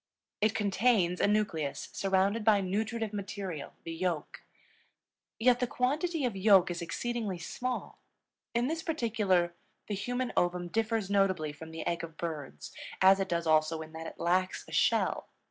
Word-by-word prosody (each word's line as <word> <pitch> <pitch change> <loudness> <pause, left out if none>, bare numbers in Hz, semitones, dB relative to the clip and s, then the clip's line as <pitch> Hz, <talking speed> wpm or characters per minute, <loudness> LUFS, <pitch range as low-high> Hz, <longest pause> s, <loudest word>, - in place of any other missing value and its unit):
It 215 +1 +2
contains 200 -3 +2
a - - +4
nucleus 205 -9 -1
surrounded 195 +3 +1
by 210 -2 +5
nutritive 215 +3 -2
material, 195 -5 -5
the 165 - -5
yolk. 165 -2 -3 1.0
Yet 245 +1 +4
the 250 - +1
quantity 295 +6 0
of 235 -5 -1
yolk 190 -2 +5
is 175 - -4
exceedingly 220 +2 -3
small. 250 +9 -4 0.6
In 235 +1 +2
this 320 +4 -1
particular 210 - +1 0.3
the 210 - -4
human 245 +5 -2
ovum 175 0 +1
differs 225 -1 0
notably 185 -7 +2
from 160 +2 -10
the 160 0 -6
egg 170 -1 -1
of 165 -1 -8
birds, 150 - -5 0.3
as 190 +1 +6
it 195 0 -1
does 170 -1 0
also 160 0 +2
in 160 0 -13
that 160 0 -6
it - - -10
lacks 185 +2 +1
a - - -12
shell. - - +2
195 Hz, 160 wpm, -31 LUFS, 170-225 Hz, 1.0 s, as